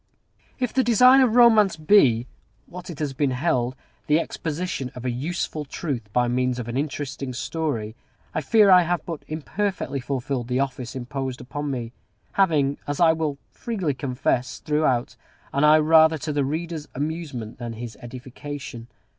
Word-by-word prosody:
If 250 -4 -2
the 260 - +3
design 250 +3 +6
of 240 -3 +3
Romance 220 -7 +6
be, 140 - +4 0.4
what 180 +1 -10
it 165 - -7
has 145 -2 -2
been 140 +1 +1
held, 130 -2 0 0.3
the 150 +2 +4
exposition 165 -4 -3
of 125 0 -8
a 125 - 0
useful 155 +4 -3
truth 135 -7 -5
by 125 +2 +2
means 125 +1 0
of 120 -2 -5
an 120 - -4
interesting 140 -2 -3
story, 120 -5 -3 0.4
I - - -1
fear 205 +6 +5
I 180 -1 +8
have 175 0 -1
but 165 -4 -6
imperfectly 160 0 -3
fulfilled 130 -1 -3
the 125 +1 0
office 130 -3 -3
imposed 130 0 -4
upon 145 +4 -5
me; 120 -4 -4 0.4
having, 150 -8 +2
as 145 0 -3
I 165 -2 +6
will 155 -3 -2
freely 195 -11 -2
confess, 125 -1 -1
had, - - -21
throughout, 135 -5 +1 0.4
an 140 - +1
eye 150 +1 +7
rather 160 +1 +5
to 155 0 -4
the 145 -1 +1
reader's 160 +1 -4
amusement 145 -7 -4
than 120 -2 -5
his 115 -1 -7
edification. 125 0 -8
145 Hz, 165 wpm, -24 LUFS, 125-165 Hz, 0.4 s, I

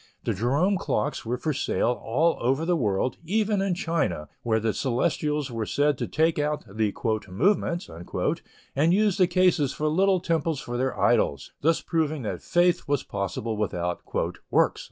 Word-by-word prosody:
The - - 0
Jerome 145 - +1
clocks 145 - -2
were 125 +2 -1
for 155 +4 -1
sale 120 - 0
all 160 +9 +2
over 135 +6 +1
the 175 +1 +2
world, 115 -3 0
even 205 +3 +1
in 195 -2 0
China, 165 - -1
where 110 -2 +1
the 110 -1 0
Celestials 150 +2 0
were 115 -2 -3
said 145 0 +2
to - - -2
take 160 0 +1
out 150 -2 -1
the 105 0 -1 0.4
"movements," 175 - +1
and 135 - -2
use 210 -2 +2
the 185 -3 +4
cases 175 -6 +2
for 155 - -1
little 185 +4 +3
temples 165 -3 0
for 120 - -6
their 130 +2 -1
idols, 70 -1 +2
thus 165 +2 +2
proving 155 -4 -1
that 105 - -4
faith 175 0 +2
was 145 -2 0
possible 100 +3 -3
without 90 -4 -2 0.5
"works." - - +2
150 Hz, 165 wpm, -26 LUFS, 115-170 Hz, 0.5 s, the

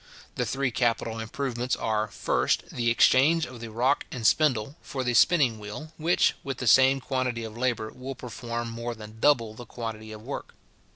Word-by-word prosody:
The - - -2
three 135 -1 -1
capital 115 -1 0
improvements 125 +2 -2
are, 110 -1 -1
first, - - 0
the 120 -1 0
exchange 145 +7 +4
of 125 -1 -10
the 115 0 -7
rock 125 +6 +1
and 120 -3 -5
spindle 135 +1 +3
for 130 -2 -4
the 125 -1 0
spinning 125 -3 +4
wheel, 105 +10 -8
which, 165 +3 +3
with 135 -1 -4
the 125 - -4
same 130 +4 +6
quantity 125 -3 -2
of 110 -1 -7
labour, 120 -3 -1
will 130 +1 -7
perform 120 -1 -5
more 115 +1 -4
than 110 0 -11
double 115 -5 +3
the 120 +2 -11
quantity 110 -2 -6
of 110 0 -9
work. 140 +4 -7
120 Hz, 180 wpm, -27 LUFS, 110-130 Hz, -, same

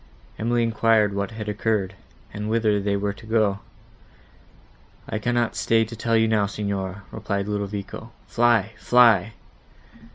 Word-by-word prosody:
Emily 120 +1 +1
enquired 110 -2 +2
what 100 +1 -2
had 110 -2 -7
occurred, 105 -2 -1 0.4
and 105 +1 -4
whither 110 -2 +2
they 100 0 0
were 100 0 -2
to 110 - -15
go? 110 -3 +1 1.5
"I 110 - -3
cannot 120 0 0
stay 115 0 +2
to 115 +2 -9
tell 115 +1 +1
you 110 0 +3
now, 105 -2 +2
Signora," 100 -2 -4
replied 100 -2 -3
Ludovico: 100 -1 -5
"fly! 115 -3 +2
fly!" 115 -4 +4
105 Hz, 135 wpm, -23 LUFS, 100-115 Hz, 1.5 s, fly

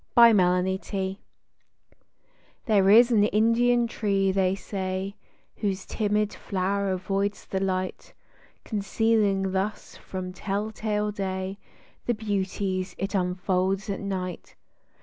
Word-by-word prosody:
03 190 -2 +3 1.5
There 200 -5 +4
is 235 +4 +7
an 215 -3 +5
Indian 235 +3 +3
tree, 200 -4 0
they 190 -1 +2
say, 190 0 -4 0.4
Whose 195 -3 -2
timid 210 -1 0
flow'r 195 +1 -1
avoids 195 +2 -1
the 190 - -2
light, 185 -1 -3 0.5
Concealing 205 -2 +1
thus 195 +3 -3
from 185 -1 -6
tell 200 +3 -3
tale 210 -1 -1
day 190 -1 -4 0.5
The 240 - +2
beauties 195 -3 -2
it 195 +2 -3
unfolds 185 +1 0
at 195 - -3
night. 185 -3 -5
195 Hz, 105 wpm, -26 LUFS, 190-210 Hz, 1.5 s, is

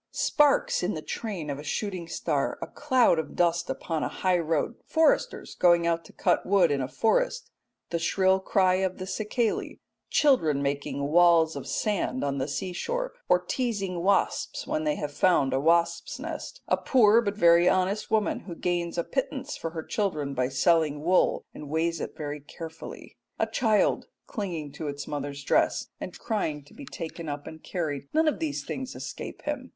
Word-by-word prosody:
Sparks - - +2
in - - -1
the - - -6
train 185 -10 -4
of 140 - -5
a - - -8
shooting 185 +1 -3
star; - - -1
a - - -4
cloud 260 - +2
of 160 - -5
dust 170 0 +1
upon 160 -2 -2
a - - 0
high 185 -2 +1
road; 165 +5 0
foresters 320 -1 +1
going 175 -1 +4
out 170 0 +1
to - - -14
cut 175 - +1
wood 185 -4 +3
in 140 -1 0
a 130 - -2
forest; - - 0 0.4
the 170 - 0
shrill 190 +3 +2
cry 190 -1 +2
of 190 -1 -1
the 185 - -5
cicale; 215 +3 -1 0.3
children 160 - +3
making 140 0 -2
walls 170 -1 +5
of - - -6
sand 215 +4 -1
on 140 -1 -1
the 130 - -1
sea 165 +6 -3
shore, - - -3 0.2
or - - +6
teasing 200 -8 -2
wasps 200 +3 +1
when 310 +1 -2
they 300 -1 +1
have 150 - -4
found 145 -5 +3
a 135 - +2
wasps' 170 +3 +1
nest; - - -6
a - - +2
poor 230 -3 +5
but 205 -2 -3
very 170 -2 +6
honest 190 +3 0
woman 215 -1 +1
who 175 -4 -9
gains 175 0 -2
a 170 - +1
pittance 270 - -3
for 165 - -4
her 160 -1 -6
children 155 -10 -2
by 125 -1 0
selling 150 +1 +2
wool, 180 +3 +2
and 150 - -9
weighs 165 +1 0
it - - -6
very 150 -1 -4
carefully; 160 +3 -10 0.2
a - - +2
child 215 -4 +1 0.2
clinging 170 - -4
to 150 +2 -6
its 140 -1 -5
mother's 140 -1 -4
dress - - +1
and - - -7
crying 160 -10 -2
to 145 - -19
be 285 - -10
taken 165 -4 -6
up 145 0 -5
and 160 0 -9
carried 150 -6 -3
none 320 0 +4
of 305 - +1
these 315 -3 -3
things 260 -1 -5
escape - - -7
him. 290 -3 -4
175 Hz, 185 wpm, -27 LUFS, 155-215 Hz, 0.4 s, or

